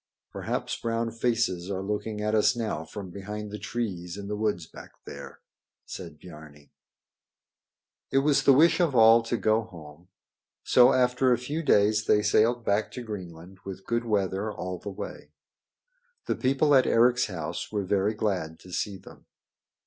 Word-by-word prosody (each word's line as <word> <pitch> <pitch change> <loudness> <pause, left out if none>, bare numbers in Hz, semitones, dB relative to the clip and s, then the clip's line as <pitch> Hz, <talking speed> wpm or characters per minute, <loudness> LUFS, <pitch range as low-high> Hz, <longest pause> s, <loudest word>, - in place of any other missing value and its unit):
"Perhaps - - -3
brown 115 0 -1
faces 115 -6 -1
are 95 -1 -3
looking 105 +1 -3
at 105 +1 -1
us 110 +3 +3
now 110 -9 -3
from 95 +2 -8
behind 105 +2 -7
the 105 - -6
trees 95 -7 -4
in 100 -1 -7
the 105 - -3
woods 105 -6 -1
back - - -13
there," - - -10 0.4
said 85 -5 -9
Biarni. 75 -4 -14 1.4
It 135 - 0
was 145 -2 +4
the 140 - +5
wish 155 +7 +5
of 165 -7 +1
all 115 0 +7
to 115 +1 -2
go 110 0 +2
home. 85 -4 -13 0.6
So 125 +1 +6
after 125 0 +2
a 120 - +4
few 145 +7 -4
days 105 -6 +3
they 105 - +3
sailed 115 +3 +2
back 105 +1 0
to 125 - -6
Greenland 95 -4 -9
with 95 0 -8
good 120 0 -1
weather 100 -1 -1
all 90 -3 -5
the 100 - -7
way. 95 - -8 0.9
The - - -1
people 140 +3 +2
at 130 -2 +5
Eric's 125 +2 +3
house 85 -7 -5
were 105 -2 -1
very 100 +3 +1
glad 90 -7 -2
to 90 - -14
see 100 +1 -2
them. - - -16
105 Hz, 165 wpm, -27 LUFS, 95-120 Hz, 1.4 s, all